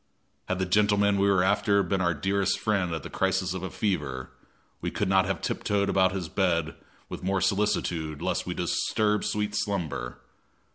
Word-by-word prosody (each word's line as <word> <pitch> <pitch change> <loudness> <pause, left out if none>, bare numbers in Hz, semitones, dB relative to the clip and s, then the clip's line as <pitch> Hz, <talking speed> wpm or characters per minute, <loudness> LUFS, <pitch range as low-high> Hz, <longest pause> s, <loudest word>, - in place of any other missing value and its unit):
Had 95 - -1
the 95 - 0
gentleman 100 +1 +3
we 100 0 +3
were 95 -2 +4
after 100 +1 +3
been 95 +2 -1
our 85 -2 +1
dearest 95 +5 0
friend 100 -5 0
at 80 -3 -4
the - - -7
crisis 95 -1 0
of 95 - -4
a 95 - -4
fever, 75 -11 -2 0.5
we - - -1
could - - -2
not 95 0 +3
have 95 -3 -3
tiptoed 100 -1 0
about 95 -1 +3
his 95 -3 -3
bed 85 -3 0 0.3
with - - -7
more 95 +1 0
solicitude 90 -7 0
lest - - -2
we - - -3
disturb 105 -1 0
sweet 105 0 -1
slumber. 90 -12 -2
95 Hz, 180 wpm, -27 LUFS, 90-100 Hz, 0.5 s, were